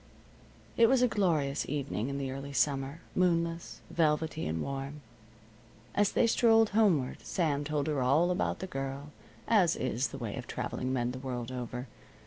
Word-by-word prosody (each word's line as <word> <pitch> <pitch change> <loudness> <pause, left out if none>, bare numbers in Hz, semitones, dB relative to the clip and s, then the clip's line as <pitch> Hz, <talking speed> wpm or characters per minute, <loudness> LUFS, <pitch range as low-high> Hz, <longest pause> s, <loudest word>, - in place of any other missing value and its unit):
It 230 - +7
was 260 -1 +4
a - - +6
glorious 160 - 0
evening 140 -4 -2
in 140 - -3
the 135 -1 -3
early 140 +1 -6
summer, 140 +2 0
moonless, 170 -2 0
velvety, 160 -1 +1
and 80 +1 -2
warm. 140 - -4 0.9
As 205 -1 +2
they - - +4
strolled 225 -1 +4
homeward, 190 -12 +2
Sam 150 -5 0
told 150 -1 -1
her 150 -4 0
all 150 +8 +3
about 180 - -1
the - - -2
Girl, 135 -1 -5 0.4
as 185 -7 +4
is 130 0 -1
the - - -8
way 115 -6 -4
of - - -6
traveling 130 0 -3
men 125 -2 0
the 130 - -6
world 125 -2 -4
over. 125 0 -5
145 Hz, 165 wpm, -31 LUFS, 135-170 Hz, 0.9 s, It